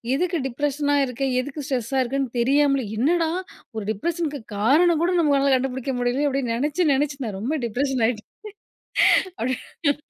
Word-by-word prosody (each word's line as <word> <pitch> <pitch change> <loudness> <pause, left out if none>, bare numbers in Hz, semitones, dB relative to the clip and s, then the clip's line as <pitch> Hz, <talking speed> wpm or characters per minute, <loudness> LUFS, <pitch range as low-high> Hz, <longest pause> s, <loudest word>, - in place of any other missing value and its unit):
எதுக்கு 345 +1 0
டிப்ரஷனா 290 +2 0
இருக்க, 250 +1 -8 0.2
எதுக்கு 285 +2 -6
ஸ்ட்ரெஸ்ஸா 260 0 -1
இருக்கேன்னு 265 0 -2
தெரியாமலே, 275 0 +3
என்னடா! 320 +7 +2 0.5
ஒரு 215 - -3
டிப்ரஷனு 330 - -2
க்கு 285 - -6 0.2
காரணம் 315 +9 +4
கூட 355 - +2
நம்மளால 280 -3 +3
கண்டுபிடிக்க 260 +1 -2
முடியலையே 245 +4 +1
அப்படின்னு 260 -4 -1
நெனச்சி, 295 +7 0
நெனச்சி 275 0 0
நான் 205 -4 -4
ரொம்ப 245 +9 -2
டிப்ரஷன் 255 +1 -1
ஆயிட்டேன்." 220 -3 -5 1.0
அப்படின்னு. 260 +4 -1
275 Hz, 145 wpm, -23 LUFS, 250-295 Hz, 1.0 s, காரணம்